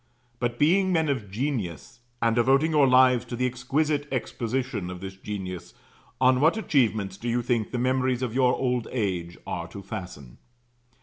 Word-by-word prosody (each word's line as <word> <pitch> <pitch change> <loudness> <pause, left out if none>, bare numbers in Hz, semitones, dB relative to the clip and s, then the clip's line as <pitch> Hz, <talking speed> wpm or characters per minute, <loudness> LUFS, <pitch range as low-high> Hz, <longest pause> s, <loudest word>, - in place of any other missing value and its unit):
But, 120 -1 -1
being 185 +7 +3
men 160 -3 +2
of 115 -8 -2
genius, 115 - -4 0.2
and 115 -1 +3
devoting 135 +6 +3
your 150 -3 +5
lives 125 -1 +5
to 120 - -5
the 125 +2 0
exquisite 140 +4 0
exposition 120 -3 -2
of 90 -1 -7
this 95 +1 -7
genius, 95 -3 -6 0.4
on 130 0 +4
what 160 +8 +4
achievements 110 - +1
do 120 +4 -4
you 120 +1 0
think 115 -3 0
the 125 - -3
memories 130 0 +1
of 120 -3 -2
your 125 -1 +3
old 125 -3 -1
age 90 -7 -2
are 90 -3 -4
to 100 +4 -10
fasten? 90 - -8
120 Hz, 170 wpm, -26 LUFS, 100-130 Hz, 0.4 s, your